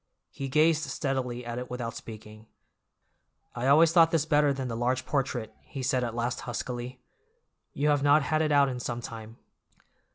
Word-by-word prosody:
He 135 Hz, -1 st, -5 dB
gazed 155 Hz, +3 st, +3 dB
steadily 130 Hz, -4 st, -3 dB
at 120 Hz, +1 st, -4 dB
it 125 Hz, -, -7 dB
without 120 Hz, -2 st, -5 dB
speaking. 110 Hz, 0 st, -11 dB, 1.1 s
"I 125 Hz, +2 st, -2 dB
always 155 Hz, +4 st, +6 dB
thought 165 Hz, -1 st, +6 dB
this 165 Hz, -3 st, +1 dB
better 150 Hz, -2 st, +3 dB
than 135 Hz, -2 st, -3 dB
the 115 Hz, -, -4 dB
large 120 Hz, +2 st, -1 dB
portrait," 125 Hz, -6 st, -2 dB
he 135 Hz, -, -7 dB
said 130 Hz, -1 st, +1 dB
at 115 Hz, -1 st, -3 dB
last 120 Hz, +1 st, -2 dB
huskily. 125 Hz, +1 st, -5 dB, 0.7 s
"You 150 Hz, +2 st, +1 dB
have 145 Hz, -1 st, +2 dB
not 145 Hz, +1 st, +4 dB
had 155 Hz, +2 st, 0 dB
it 155 Hz, -1 st, +1 dB
out 140 Hz, -1 st, +5 dB
in 125 Hz, -2 st, -4 dB
some 120 Hz, -1 st, -4 dB
time." 115 Hz, -1 st, -9 dB
130 Hz, 175 wpm, -28 LUFS, 120-145 Hz, 1.1 s, always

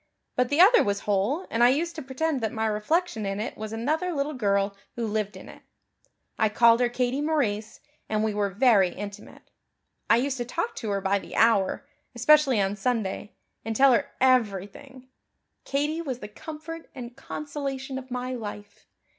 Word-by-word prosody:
But 250 Hz, 0 st, +1 dB
the 285 Hz, -, 0 dB
other 415 Hz, +7 st, +8 dB
was 200 Hz, 0 st, -1 dB
whole 210 Hz, -, 0 dB
and 230 Hz, +1 st, +2 dB
I 240 Hz, -, +7 dB
used 330 Hz, +6 st, 0 dB
to 315 Hz, -, -5 dB
pretend 275 Hz, +2 st, -2 dB
that 220 Hz, -2 st, -1 dB
my 220 Hz, 0 st, -2 dB
reflection 220 Hz, +5 st, 0 dB
in 195 Hz, 0 st, -3 dB
it 220 Hz, -, -4 dB
was 215 Hz, 0 st, -6 dB
another 305 Hz, +11 st, -1 dB
little 295 Hz, -1 st, -2 dB
girl 200 Hz, -5 st, 0 dB, 0.2 s
who 235 Hz, -, -2 dB
lived 210 Hz, -1 st, -2 dB
in -, -, -12 dB
it. -, -, -13 dB, 0.8 s
I 220 Hz, -, +3 dB
called 230 Hz, +2 st, +5 dB
her 245 Hz, -1 st, +2 dB
Katie 250 Hz, +3 st, -1 dB
Maurice, 225 Hz, -9 st, -1 dB, 0.3 s
and 215 Hz, 0 st, 0 dB
we 220 Hz, -1 st, 0 dB
were 205 Hz, -1 st, 0 dB
very 200 Hz, -2 st, +4 dB
intimate. 200 Hz, +2 st, -10 dB, 0.6 s
I -, -, +7 dB
used 265 Hz, +2 st, -1 dB
to 240 Hz, -, -2 dB
talk 400 Hz, -, -3 dB
to 225 Hz, -, -4 dB
her 200 Hz, -1 st, -1 dB
by 195 Hz, +1 st, +1 dB
the -, -, -10 dB
hour, 225 Hz, +2 st, +3 dB, 0.3 s
especially 270 Hz, 0 st, +4 dB
on 195 Hz, 0 st, 0 dB
Sunday, 215 Hz, -1 st, -2 dB, 0.3 s
and 225 Hz, 0 st, -3 dB
tell 270 Hz, +3 st, +6 dB
her 280 Hz, +4 st, +1 dB
everything. 255 Hz, +2 st, 0 dB, 0.6 s
Katie 295 Hz, +4 st, -1 dB
was 265 Hz, -7 st, -4 dB
the 210 Hz, -, -8 dB
comfort 315 Hz, +7 st, -9 dB
and 245 Hz, -2 st, -8 dB
consolation 275 Hz, -2 st, -5 dB
of 260 Hz, 0 st, -12 dB
my 250 Hz, +1 st, -3 dB
life. 205 Hz, -3 st, -8 dB
245 Hz, 180 wpm, -26 LUFS, 210-280 Hz, 0.8 s, other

